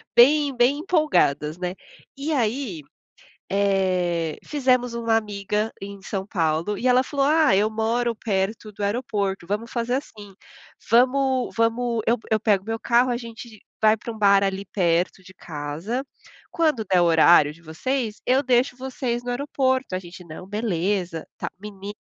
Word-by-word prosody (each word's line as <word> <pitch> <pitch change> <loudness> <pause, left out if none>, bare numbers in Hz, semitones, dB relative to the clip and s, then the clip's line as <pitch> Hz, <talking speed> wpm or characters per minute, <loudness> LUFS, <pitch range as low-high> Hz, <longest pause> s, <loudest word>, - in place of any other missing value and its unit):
bem 280 +2 +5
bem 250 +4 +3
empolgadas, 300 - +1
né. 180 0 -3 0.4
E 300 +3 -2
aí, 230 - -1 0.7
eh, 185 -4 0
fizemos 255 -4 +1
uma 230 -1 +1
amiga 210 0 -2
em 200 0 -8
São 195 -1 -4
Paulo, 165 +1 0
e 250 - -3
ela 250 +1 +5
falou: 275 0 -1
"Ah, 305 -8 +4
eu 210 +2 +2
moro 230 +2 0
perto 210 +1 -2
do 205 - -8
aeroporto. 200 -5 -2
Vamos 210 +4 -3
fazer 240 0 -1
assim, 210 -7 -6 0.6
vamos 260 +2 +3
vamos 230 0 +1
eu 235 +2 +3
eu 220 - +3
pego 205 -3 +2
meu 225 0 -2
carro, 240 +2 +3
a 240 - 0
gente 230 -2 -9 0.2
vai 220 0 +4
pra 235 - -7
um 220 - -11
bar 200 -1 +5
ali 195 0 -1
perto 175 0 +1
de 185 0 -15
casa. 160 - -5 0.5
Quando 310 -10 +1
der 180 - +5
o - - +4
horário 160 -2 +5
de 165 - -19
vocês, 215 - -3
eu 260 +3 +3
deixo 250 0 +2
vocês 255 -2 -3
no 245 - -9
aeroporto". 260 -3 -1
A - - 0
gente: 180 0 -11
"Não, 165 +3 -9
beleza". 190 -5 -2
Tá, - - -3
menino 205 0 -8
220 Hz, 160 wpm, -23 LUFS, 190-245 Hz, 0.7 s, bem